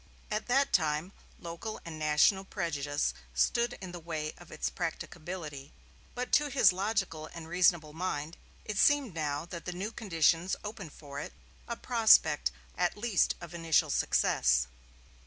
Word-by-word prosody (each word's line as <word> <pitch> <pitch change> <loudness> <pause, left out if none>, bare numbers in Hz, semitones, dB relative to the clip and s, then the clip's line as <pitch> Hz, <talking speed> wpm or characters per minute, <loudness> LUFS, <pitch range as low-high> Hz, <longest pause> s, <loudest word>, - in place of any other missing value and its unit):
At 215 +1 -2
that 270 +3 +2
time 155 +1 +1 0.3
local 170 +6 -6
and 160 -2 -7
national 155 +6 +4
prejudice 145 - -2 0.2
stood 235 - +2
in 185 -2 -6
the 175 - -7
way 155 -2 -4
of - - -14
its - - -2
practicability; 155 -5 -5 0.4
but 250 0 -3
to 295 -1 +4
his 270 -8 +5
logical 190 -5 -2
and 165 -1 -7
reasonable 170 -3 +2
mind 160 -2 -3 0.3
it 210 -2 -3
seemed 285 -8 +4
now 150 -1 -2
that 170 -1 -8
the 180 - -3
new 195 +5 -4
conditions 170 -4 +2
opened 205 -7 -7
for 140 -1 -8
it - - -6 0.3
a 235 - -3
prospect 220 -11 +4 0.3
at 180 +2 0
least 215 -3 +2
of 170 -1 -9
initial 165 -2 +2
success. 60 0 +2
170 Hz, 150 wpm, -31 LUFS, 155-205 Hz, 0.4 s, his